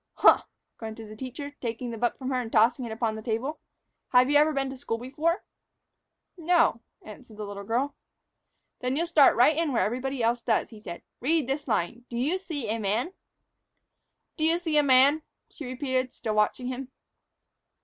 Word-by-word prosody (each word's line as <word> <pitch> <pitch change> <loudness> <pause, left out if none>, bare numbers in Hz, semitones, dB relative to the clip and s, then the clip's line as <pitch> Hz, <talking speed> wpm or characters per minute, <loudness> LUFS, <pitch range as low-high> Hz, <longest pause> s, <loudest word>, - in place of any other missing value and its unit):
"Huh!" - - +6 0.4
grunted 220 -1 -7
the - - -9
teacher, 260 +5 -7
taking 235 0 -4
the 230 - -6
book 240 - 0
from 260 -1 -4
her 255 -1 +1
and 225 -2 -7
tossing 240 +3 +3
it 230 - -6
upon 220 0 -1
his 220 - -7
table. 245 +8 -2 0.5
"Have 255 +2 +4
you - - +2
ever 305 +1 +5
been 275 -2 -1
to - - -7
school 250 -4 -3
before?" 300 - -1 0.9
"No," 335 -9 +2 0.2
answered 215 +1 -12
the 210 - -5
little 200 0 -7
girl. 250 +7 -1 0.9
"Then 250 +1 -1
you'll 335 +4 +1
start 315 -5 +5
right 250 +6 +5
in 325 -2 0
where 245 - +2
everybody 255 +3 -2
else 235 +1 +1
does," 230 0 0
he 220 - -11
said. 170 -4 -8 0.2
"Read 305 +1 +1
this 275 +2 -2
line. 230 +2 -1
'Do 235 - -5
you 300 +10 0
see 300 - -5
a 225 - -1
man?'" 220 - -1 1.3
"'Doyouseeaman?'" 305 -3 +4 0.3
she 295 - -9
repeated, 255 0 -1
still 220 -2 -4
watching 215 +4 +1
him. 255 0 -5
255 Hz, 175 wpm, -27 LUFS, 225-290 Hz, 1.3 s, Huh